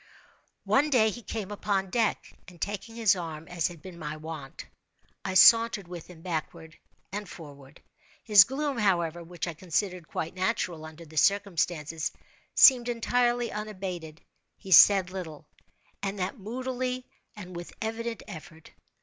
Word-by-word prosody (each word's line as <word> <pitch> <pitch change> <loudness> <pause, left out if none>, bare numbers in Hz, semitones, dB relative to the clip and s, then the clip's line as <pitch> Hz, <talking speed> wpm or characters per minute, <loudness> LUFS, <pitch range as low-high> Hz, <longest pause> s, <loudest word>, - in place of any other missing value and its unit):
One 290 +3 +3
day 220 -6 +4
he 240 - -8
came 210 -3 -5
upon 195 -2 -1
deck, 230 -1 0
and, 180 -2 -14
taking 205 +4 -4
his 220 -4 +3
arm 165 -3 -6
as 175 -2 -1
had 170 -3 -11
been 180 -2 -10
my 155 -1 -5
wont, 155 -3 -8 0.6
I 190 -1 -3
sauntered 230 -2 +6
with 175 -2 -9
him 165 -2 -14
backward 160 -2 -5 0.3
and 205 -1 -5
forward. 145 -4 -13 0.4
His 210 -4 +8
gloom, 275 +2 -3
however 175 -5 +1
(which 175 +1 -6
I 170 - -4
considered 180 +1 -2
quite 165 +2 -4
natural 185 -4 -2
under 160 +1 -11
the 155 0 -13
circumstances), 170 -4 +1 0.4
seemed 245 -3 +7
entirely 240 0 +1
unabated. 185 -7 -6 0.4
He 190 - -11
said 190 +1 +7
little, 160 -5 -7 0.6
and 200 0 -3
that 190 +6 -3
moodily, 255 +3 -4 0.3
and 185 -4 -9
with 175 0 -7
evident 230 +1 -4
effort. 165 -4 -11
185 Hz, 145 wpm, -28 LUFS, 165-220 Hz, 0.6 s, His